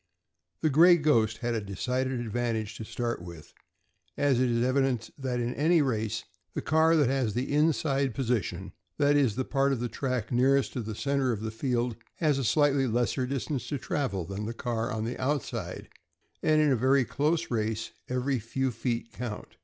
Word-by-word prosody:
The 155 - +2
"Gray 170 +5 +7
Ghost" 115 -8 +2
had 120 - +1
a 115 - -1
decided 125 +6 -2
advantage 115 -2 -2
to - - -6
start 120 -1 -3
with, 85 -3 -11 0.6
as 140 -3 +2
it 130 -1 +2
is 120 0 +1
evident 130 -3 +1
that 130 -3 -2
in 120 +1 -1
any 165 +4 +3
race 110 -4 -1 0.3
the - - -1
car 160 +2 +4
that 150 -5 +4
has 130 -5 0
the 130 +3 -1
inside 140 -4 +2
position, 105 -8 -2 0.2
that 145 -1 +3
is, 135 -8 +3
the 130 +1 -1
part 140 0 +1
of 135 - 0
the 120 - -1
track 125 -1 -3
nearest 130 +2 +3
to 125 - -2
the 110 -1 -5
center 140 +1 0
of 110 -3 -3
the 110 0 -3
field, 120 0 -1 0.2
has 150 -4 +1
a - - -1
slightly 140 +2 +3
lesser 120 +2 0
distance 140 +1 -3
to 145 - -2
travel 130 - -2
than 100 +4 -5
the 115 - -5
car 115 -1 -2
on 110 -2 -2
the 120 - -4
outside, 140 +1 -3 0.5
and 155 0 +3
in 150 -2 +4
a 130 +1 +3
close 155 +6 0
race 110 -1 -1 0.2
every 125 +1 0
few 130 +4 -2
feet 115 0 -3
count. 115 -3 -6
125 Hz, 185 wpm, -28 LUFS, 115-140 Hz, 0.6 s, Gray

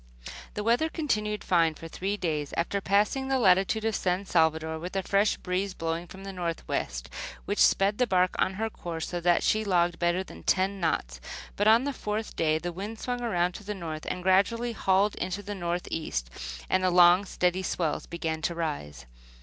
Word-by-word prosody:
* 65 +1 -12
The 210 - -2
weather 240 +8 +2
continued 210 -10 -1
fine 165 -3 +3
for 165 - -9
three 195 +5 -3
days, 150 -6 -2
after 195 +4 0
passing 210 +8 +1
the 270 0 +2
latitude 195 0 +3
of 225 -2 +1
San 185 +2 0
Salvador, 160 -2 +1
with 180 +4 -6
a 195 - 0
fresh 200 +3 +2
breeze 185 +1 -2
blowing 165 +1 -3
from 190 +3 -11
the 195 0 -6
northwest, 165 - -3 0.4
which - - -2
sped 200 +3 +4
the 250 - +3
bark 185 -2 +2
on 190 - +1
her 220 +3 -1
course 170 -6 -5
so 175 - -3
that 175 0 +3
she 215 0 +2
logged 175 -4 +1
better 175 +2 +1
than - - -12
ten 195 +1 +1
knots; 65 - -1 0.3
but 205 - +1
on 225 +3 +6
the 285 0 -2
fourth 215 -2 -4
day 155 -1 +2
the 175 +2 -4
wind 205 +5 -6
swung 245 +1 -3
around 180 -7 +1
to 205 - -10
the 210 +1 -4
north 160 -4 -6
and 180 - -3
gradually 215 +6 +2
hauled 195 0 +2
into 185 +3 -3
the 205 +1 -5
northeast, 170 - -3 0.4
and 185 0 +1
the 185 - +4
long, 175 +1 +6
steady 180 -1 0
swells 165 -4 -2
began 160 -2 -3
to 170 +2 -1
rise. 145 - -4
185 Hz, 200 wpm, -28 LUFS, 170-205 Hz, 0.4 s, on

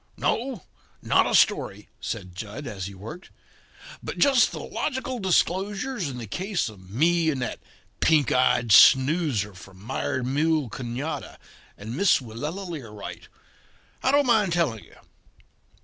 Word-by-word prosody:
"No, 240 - -1 0.4
not - - +3
a - - +1
story," - - +2
said 95 -2 -5
Jud, 105 +8 -7
as 95 -5 -5
he 100 - -10
worked, 135 - -10 0.7
"but - - -6
just 275 -3 +4
the - - -6
logical 260 -3 -3
disclosures 195 - 0
in 125 - -6
the 120 - -6
case 185 - -2
of 95 -4 -15
me 165 - +2
and 140 -4 -1
that - - -4 0.4
pink 150 -5 +3
eyed 125 -2 +2
snoozer 130 - +5
from 95 0 -14
Mired 125 +3 -3
Mule 150 +1 +1
Canada 130 +6 -5 0.4
and 110 +4 -7
Miss 200 +5 +4
Willella 145 - -6
Learight. 115 - -8 0.7
I 260 - +2
don't 285 0 +4
mind 215 -7 +3
telling 150 -11 0
you. - - -19
145 Hz, 140 wpm, -25 LUFS, 115-185 Hz, 0.7 s, snoozer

